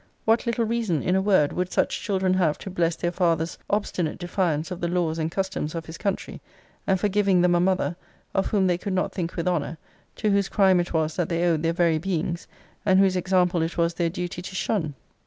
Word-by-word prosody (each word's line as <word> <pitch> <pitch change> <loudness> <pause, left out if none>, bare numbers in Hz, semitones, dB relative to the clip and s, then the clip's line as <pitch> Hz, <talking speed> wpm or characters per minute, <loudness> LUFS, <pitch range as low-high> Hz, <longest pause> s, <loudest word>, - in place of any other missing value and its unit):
What 225 +2 +2
little 235 0 +1
reason, 220 - 0
in 180 - +1
a 190 - +3
word, 190 -7 +3
would 180 0 -2
such - - 0
children 190 -3 +1
have 175 -5 +2
to 190 - -8
bless 170 -2 +1
their 175 +1 -2
father's 170 -2 0
obstinate 185 -6 -1
defiance 175 -2 -1
of 180 - -5
the 170 - 0
laws 170 -2 0
and 160 0 0
customs 175 -4 -3
of 165 -1 -4
his 160 +1 -9
country; 200 -2 -3 0.5
and 190 -1 +2
for 205 - +2
giving 200 -2 +3
them 180 0 +4
a 175 - +3
mother, 180 -3 +1 0.4
of 195 - +1
whom 200 -3 +2
they 180 -1 +1
could 195 +1 -3
not 185 - 0
think 170 -3 -3
with 170 0 -2
honour; 165 -2 -1 0.4
to 215 -2 0
whose 200 -1 +2
crime 190 -3 +4
it 175 - -2
was 160 -1 0
that 175 -3 0
they 170 0 +1
owed 165 -3 +2
their 165 0 +1
very 170 -2 +2
beings, 170 -1 -2 0.4
and 190 -3 +4
whose 195 -1 +4
example 180 -1 +2
it 165 +2 -2
was 170 0 +2
their 170 0 0
duty 180 0 -5
to 185 +1 -8
shun? 165 -7 -1
180 Hz, 230 wpm, -25 LUFS, 165-190 Hz, 0.5 s, them